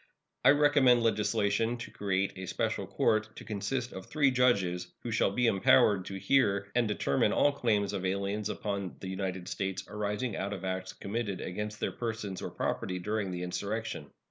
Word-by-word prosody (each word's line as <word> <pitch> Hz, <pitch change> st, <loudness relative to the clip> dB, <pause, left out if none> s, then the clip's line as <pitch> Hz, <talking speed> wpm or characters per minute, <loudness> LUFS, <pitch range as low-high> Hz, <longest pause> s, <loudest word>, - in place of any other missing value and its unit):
I -, -, +7 dB
recommend 145 Hz, -4 st, +5 dB
legislation 110 Hz, +1 st, +1 dB
to 120 Hz, -, -8 dB
create 95 Hz, -1 st, -1 dB
a 95 Hz, -1 st, -6 dB
special -, -, -1 dB
court, 110 Hz, 0 st, +1 dB
to -, -, -9 dB
consist 115 Hz, +5 st, -3 dB
of 95 Hz, -, -8 dB
three 145 Hz, -3 st, +3 dB
judges, 100 Hz, -9 st, +2 dB, 0.2 s
who 120 Hz, -, -3 dB
shall 110 Hz, -, +3 dB
be 120 Hz, +5 st, +1 dB
empowered 100 Hz, -2 st, +4 dB
to 95 Hz, -, -6 dB
hear 100 Hz, -4 st, +2 dB
and 120 Hz, -2 st, +2 dB
determine 85 Hz, -9 st, +1 dB
all 145 Hz, -, +4 dB
claims 105 Hz, -7 st, 0 dB
of 95 Hz, -2 st, -3 dB
aliens 100 Hz, +2 st, -1 dB
upon 100 Hz, -4 st, -3 dB
the 95 Hz, -, -6 dB
United 95 Hz, -1 st, -3 dB
States 95 Hz, -1 st, -3 dB
arising 105 Hz, +2 st, -2 dB
out 100 Hz, +1 st, -3 dB
of 95 Hz, -1 st, -6 dB
acts 95 Hz, 0 st, -3 dB
committed 100 Hz, -1 st, -3 dB
against 105 Hz, +3 st, -4 dB
their -, -, -1 dB
persons 110 Hz, -5 st, -4 dB
or -, -, -4 dB
property 90 Hz, -, -2 dB
during 105 Hz, +2 st, -2 dB
the 90 Hz, -1 st, -4 dB
insurrection. 100 Hz, -1 st, -3 dB
100 Hz, 175 wpm, -30 LUFS, 95-115 Hz, 0.2 s, I